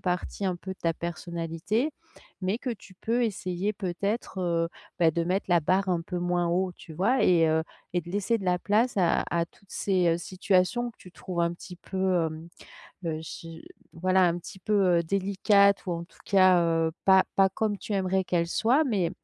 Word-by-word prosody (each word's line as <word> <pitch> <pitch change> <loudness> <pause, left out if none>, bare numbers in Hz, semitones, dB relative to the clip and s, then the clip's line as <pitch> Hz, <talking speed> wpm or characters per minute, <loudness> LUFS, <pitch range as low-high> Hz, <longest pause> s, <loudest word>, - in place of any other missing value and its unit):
partie 180 +2 -2
un 185 -2 0
peu 190 +2 -7
de - - -15
ta 165 - +1
personnalité 170 - -3 0.5
mais 190 +4 -1
que 255 - -4
tu 200 -4 -9
peux 235 +5 0
essayer 195 -1 -2
peut-être, 195 +2 -3
heu, 170 -2 0 0.3
bah, 165 -2 +5
de 170 - 0
mettre 185 +3 -1
la 175 -1 +4
barre 190 +5 +1
un 175 -2 +1
peu 180 +1 -4
moins 175 0 0
haut, 180 +1 0
tu 160 - -12
vois? 230 +10 +2
Et 170 -3 +5
heu 160 0 +2 0.3
et 175 - +1
de 175 +1 -11
laisser 205 +4 0
de 195 - -7
la 180 -1 +2
place 220 +5 +1
à 180 -3 +3
à 170 -1 +1
toutes 200 +1 -27
ces 180 -4 +1
situations 190 +6 0
que - - -25
tu 180 - -14
trouves 180 -2 -4
un 170 0 +1
petit 180 +1 -11
peu, 185 -2 0
hem, 160 +1 -7 0.6
heu, 160 -1 -2
j 165 0 -9 0.3
voilà, 185 +2 +2
un 170 +1 -1
petit 190 +2 -11
peu, 190 -4 +3
heu, - - +1
délicates 200 +2 +3
ou 180 - -1
en 170 0 -4
tout - - -23
cas, 185 -3 +5
heu, 165 -1 +1
pas 190 -1 +6
pas 195 0 +5
comme 205 +2 -1
tu 215 - -6
aimerais 190 0 +1
qu'elles 170 -1 0
soient. 255 - +3
Mais 195 - 0
185 Hz, 205 wpm, -27 LUFS, 170-200 Hz, 0.6 s, pas